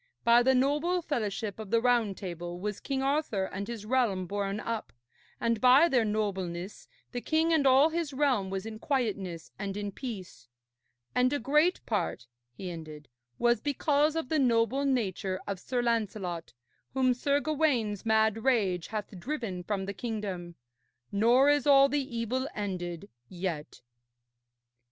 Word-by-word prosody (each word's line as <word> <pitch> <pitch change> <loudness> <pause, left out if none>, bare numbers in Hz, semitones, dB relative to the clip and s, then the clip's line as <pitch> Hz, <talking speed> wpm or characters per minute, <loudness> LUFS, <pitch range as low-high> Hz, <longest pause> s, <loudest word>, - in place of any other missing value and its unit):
By 235 0 +6
the 265 +2 +4
noble 300 +7 +1
fellowship 215 - -3
of 215 -3 -7
the 230 +2 +3
Round 235 -5 +2
Table 175 -2 -6
was 210 +1 -3
King 270 -1 -2
Arthur 275 -8 0
and 195 +1 -5
his 230 -3 -6
realm 220 -6 +1
borne 200 +2 -2
up, 230 0 -4 0.5
and 230 -2 0
by 260 +6 +7
their 255 -7 +3
nobleness 195 -4 -3 0.2
the 245 - -4
king 320 +4 +2
and 290 -4 +3
all 270 +4 +6
his 325 -2 -2
realm 260 -8 +1
was 190 +1 -4
in 220 -1 -7
quietness 200 - -2
and 200 0 -4
in 205 -1 -3
peace. 190 - -8 0.7
And 250 +1 +3
a 290 - +1
great 300 +8 +2
part,' - - -2 0.3
he 180 +9 -7
ended, 155 -4 -9 0.3
'was 240 0 +2
because 295 +1 +1
of 325 -6 -2
the 315 - +2
noble 250 +2 +2
nature 200 -7 -1
of 200 -2 -4
Sir 245 +4 -2
Lancelot, 205 - -2 0.4
whom 255 -1 +3
Sir 280 +3 +1
Gawaine's 280 -10 0
mad 220 -1 +2
rage 200 -10 +1
hath 210 -3 -5
driven 225 - -4
from 195 +1 -2
the 200 - -4
kingdom. 195 -6 -5 0.6
Nor 235 +7 +4
is 290 0 +3
all 275 -1 +7
the 275 -4 -2
evil 255 +4 -1
ended 185 -3 -4 0.2
yet.' 175 -5 -5
225 Hz, 155 wpm, -29 LUFS, 195-265 Hz, 0.7 s, by